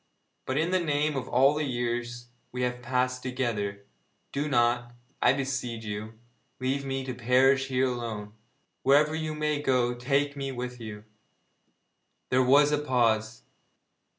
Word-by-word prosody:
But 130 - -1
in 165 +3 +1
the 185 - +3
name 150 -2 0
of 130 -2 -3
all 135 +3 +4
the 150 +1 -1
years 120 -2 -3 0.2
we 125 0 -3
have 125 0 -2
passed 125 +1 0
together, 110 -6 -3 0.5
do 145 +2 -2
not, 120 -1 +1 0.3
I - - +6
beseech 130 -4 -3
you, 105 +1 -5 0.5
leave 135 +2 -1
me 135 -1 -3
to 130 - -4
perish 130 +3 +3
here 130 0 +1
alone! 115 -4 -4 0.5
Wherever 150 +3 +4
you 155 -1 -3
may 150 -1 -1
go 125 -3 +2
take 140 +4 0
me 135 -1 -3
with 125 -1 -5
you!' 105 -2 -8 1.3
There 130 0 +4
was 140 +3 +5
a 150 - +2
pause. 115 -5 +1
130 Hz, 150 wpm, -28 LUFS, 120-140 Hz, 1.3 s, I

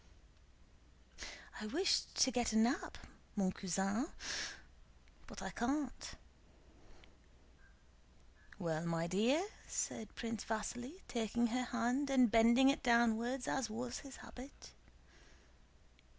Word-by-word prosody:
"I 215 - -3
wished 345 - +1
to 260 - +6
get 240 -3 +1
a - - +4
nap, 235 +5 +2 0.4
mon 190 -3 +2
cousin, 195 - 0 1.2
but - - -8
I - - -3
can't." 270 +2 -2 2.4
"Well, 165 -4 -1
my 165 0 0
dear?" 235 - +2 0.2
said 220 - -3
Prince 230 -2 -3
Vasíli, 245 - -4
taking 235 0 0
her 250 0 +1
hand 245 +4 0
and 255 -4 +5
bending 235 +4 +6
it 275 - +1
downwards 235 +1 +3
as 265 -4 0
was 240 +3 -4
his 275 -1 -10
habit. 255 - -11
235 Hz, 105 wpm, -37 LUFS, 220-260 Hz, 2.4 s, to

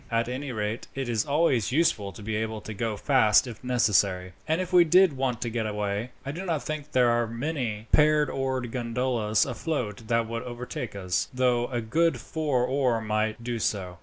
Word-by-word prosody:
"At 115 -1 0
any 130 +2 -4
rate 110 0 -3
it 135 -2 -3
is 115 -3 0
always 140 -7 +2
useful 125 -9 +1
to 105 - -11
be 110 +1 -2
able 110 0 -2
to 110 - -7
go 110 +1 -2
fast 110 -4 +4
if 120 -2 -9
necessary, 100 -7 +1
and 160 +2 +1
if 185 0 -4
we 175 -1 +8
did 180 +1 +5
want 130 -3 -1
to 120 - -1
get 110 -1 -1
away, 105 +2 -2 0.2
I 140 - -3
do 175 +6 -6
not 165 -5 -1
think 150 -1 -5
there 125 -2 +4
are 120 0 +1
many 115 -3 -3
pair 150 0 +5
oared 130 -3 -2
gondolas 115 -3 0
afloat 120 -6 -3
that 115 -1 +1
would 115 0 -4
overtake 120 -2 -6
us, 90 -2 -1
though 125 -1 +1
a 120 -2 -2
good 165 +9 +1
four 145 -6 -1
oar 130 -3 +1
might 110 +1 -1
do 120 -1 -3
so. 90 -5 -2
120 Hz, 195 wpm, -27 LUFS, 110-135 Hz, 0.2 s, we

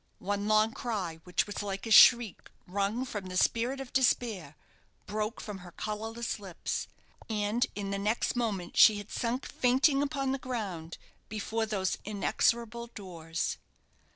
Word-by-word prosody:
One 205 +1 -2
long 215 +1 +4
cry, 190 -9 -3
which 180 - +1
was 205 0 -5
like 200 0 -4
a 225 - -4
shriek 235 -1 +7 0.2
wrung 200 +6 -1
from 205 -6 -5
the 185 0 -4
spirit 240 +7 +1
of 270 -2 -8
despair, 220 - +1 0.5
broke 215 +3 -3
from 210 -3 -6
her 180 -1 -11
colourless 225 +2 -4
lips, 190 -4 -4 0.4
and 215 +2 +1
in 200 -1 -3
the 200 - -1
next 215 +5 0
moment 210 -7 -2
she 215 -2 +8
had 205 0 -8
sunk 245 +3 -2
fainting 265 +3 +3
upon 275 -2 -1
the 270 - -1
ground 195 -11 -5 0.3
before 220 +1 -2
those 195 -3 -1
inexorable 235 +3 0
doors. 170 -7 -4
215 Hz, 150 wpm, -30 LUFS, 195-235 Hz, 0.5 s, she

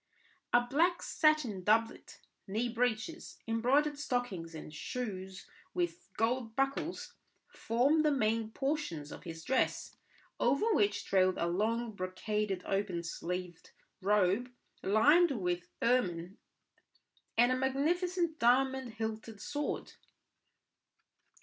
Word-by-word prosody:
A 240 - +6
black 340 +7 +2
satin 300 - +2
doublet, 225 +3 +1 0.3
knee 220 +5 -1
breeches, 245 +7 -2
embroidered 275 +6 +2
stockings, 205 - -2
and 155 -1 -8
shoes 190 -2 -5 0.3
with 175 0 -2
gold 225 0 0
buckles, 275 +5 -1 0.4
formed 270 +8 +2
the 305 - +4
main 225 -4 +1
portions 270 - -3
of - - -10
his 165 -1 -7
dress, 260 0 0 0.4
over 280 - +2
which 205 - +1
trailed 185 -1 +3
a - - 0
long 220 +7 0
brocaded 195 +1 -2
open 195 -3 -1
sleeved 180 +1 -5 0.3
robe 205 +4 +2 0.3
lined 295 - +5
with 180 -1 -2 0.2
ermine, 185 -7 +1 1.0
and 240 +2 +5
a - - +3
magnificent 325 +6 0
diamond 260 0 +2
hilted 220 -1 -5
sword. 290 +6 -3
225 Hz, 105 wpm, -33 LUFS, 190-270 Hz, 1.0 s, A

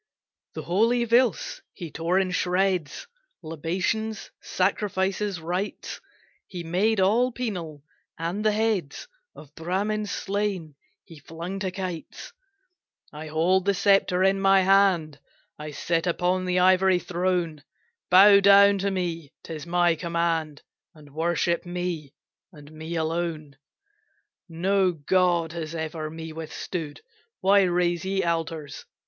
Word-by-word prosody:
The - - -5
holy 230 +7 +2
Veds 235 -4 +1
he 170 -3 -8
tore 170 +4 0
in 190 -1 +1
shreds; 180 - 0 0.4
Libations, 185 +8 -3
sacrifices, 195 0 -1
rites, 180 +5 -4 0.5
He 175 -2 -7
made 195 +6 +1
all 225 +7 +3
penal; 175 - -5 0.3
and 170 +5 -3
the 215 - +3
heads 210 -8 -1 0.3
Of 150 -1 -14
Bramins 200 +6 -2
slain, 195 -6 -3 0.3
he 165 -5 -14
flung 170 +6 -7
to 190 -1 -2
kites, 185 - -7 0.8
"I 155 +1 -8
hold 175 +5 +1
the 200 0 +2
sceptre 195 -1 +3
in 195 0 +2
my 195 0 +5
hand, 185 -6 +3 0.4
I 150 0 -6
sit 165 +3 -1
upon 180 +2 0
the 180 0 0
ivory 185 0 +4
throne, 175 -3 -2 0.5
Bow 200 +2 +8
down 200 0 +6
to 200 +1 0
me 170 -6 -3
'tis 160 -1 -8
my 175 0 +3
command, 165 -3 -2 0.3
And 145 -2 -16
worship 170 +2 0
me, 175 -5 -5 0.4
and 150 -3 -14
me 160 +2 -7
alone. 160 -2 -3 0.9
"No 185 +2 +1
god 170 +1 +1
has 165 -1 -6
ever 160 -1 -4
me 160 0 -8
withstood, 160 0 -6 0.4
Why 200 +1 +5
raise 175 -2 +1
ye 190 0 -1
altars? 165 -3 -3
180 Hz, 125 wpm, -25 LUFS, 165-195 Hz, 0.9 s, Bow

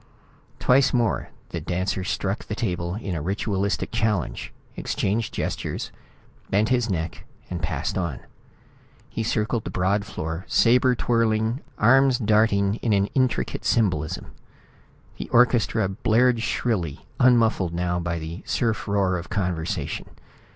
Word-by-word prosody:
Twice 130 +1 +4
more 115 -3 0 0.2
the - - -4
dancer 95 +1 -2
struck 95 +3 -2
the 105 - -4
table 90 -5 -2
in 95 -8 -4
ritualistic 100 +2 -1
challenge, 105 - -1 0.2
exchanged 105 +3 -1
gestures, - - -3 0.6
bent 105 +3 +2
his 120 -2 +2
neck 80 -3 -3 0.3
and 85 -2 -3
passed 85 - -2
on. 85 -7 -3 0.9
He - - -3
circled 110 0 0
the - - -5
broad 100 +3 +1
floor, 80 -4 -5
sabre 125 +2 +4
twirling, 115 +1 +1 0.2
arms 130 +3 +5
darting 105 -2 +2
in 115 -3 0
an 100 0 +2
intricate 130 -2 0
symbolism. 90 -9 0 0.9
The - - -5
orchestra 115 -3 +3
blared 115 +5 +2
shrilly, 95 - -1
unmuffled 115 -8 +4
now 90 0 0
by 85 0 -2
the 80 +3 -6
surf 115 -3 -1
roar 95 -3 +1
of 85 - -9
conversation. 90 -5 -2
105 Hz, 125 wpm, -24 LUFS, 90-115 Hz, 0.9 s, arms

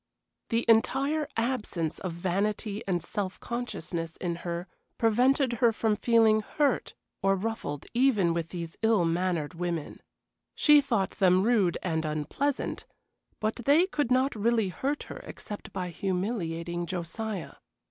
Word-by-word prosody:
The 230 +1 +1
entire 275 +7 +3
absence 215 -9 -1
of 185 - -3
vanity 200 +4 -1
and 175 -4 0
self 200 -3 -4
consciousness 170 -9 -4
in 170 -2 -2
her 170 +1 -4 0.3
prevented 250 +3 +3
her 235 -2 +6
from 220 -1 +1
feeling 220 -1 +4
hurt 285 +6 0 0.3
or 195 0 +3
ruffled 195 -8 -4
even 235 -9 +3
with 165 -1 -2
these 170 -2 -6
ill 220 -5 +3
mannered 170 -2 0
women. 170 -3 -4 0.5
She 295 -1 +6
thought 230 -9 0
them 185 -1 +3
rude 210 -6 +3
and 160 -3 0
unpleasant, 155 - -2 0.5
but 215 0 -1
they 285 +8 +4
could 295 -9 -1
not 260 +2 +3
really 220 -1 +2
hurt 275 - -2
her - - -8
except 210 - -8
by 180 -1 -3
humiliating 175 -2 -2
Josiah. 185 +3 -4
205 Hz, 135 wpm, -28 LUFS, 175-235 Hz, 0.5 s, her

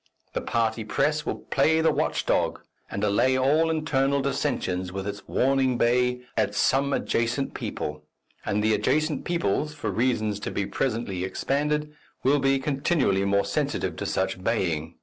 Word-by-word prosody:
The - - -1
party 115 -1 0
press 150 +8 0
will - - 0
play 160 0 +1
the 160 - +4
watch - - -1
dog - - +1 0.3
and 100 - -4
allay 105 +6 +3
all 150 +5 +3
internal 140 -3 +1
dissensions 95 -9 -1
with 95 0 -4
its 100 -1 -6
warning 130 -1 +2
bay 125 +1 +2
at - - 0
some 140 +1 +2
adjacent 120 +1 0
people, 75 0 -4 0.4
and 105 +1 0
the 110 0 +3
adjacent 150 +8 0
peoples, 150 - 0
for 115 -9 -3
reasons 110 -1 0
to - - -4
be 100 - -2
presently 110 -6 -2
expanded, 150 +9 -1 0.3
will 140 +3 +4
be 135 0 +3
continually 135 - +1
more 100 0 +2
sensitive - - -1
to - - -3
such 90 - -1
baying. 85 -8 -1
125 Hz, 155 wpm, -26 LUFS, 100-140 Hz, 0.4 s, the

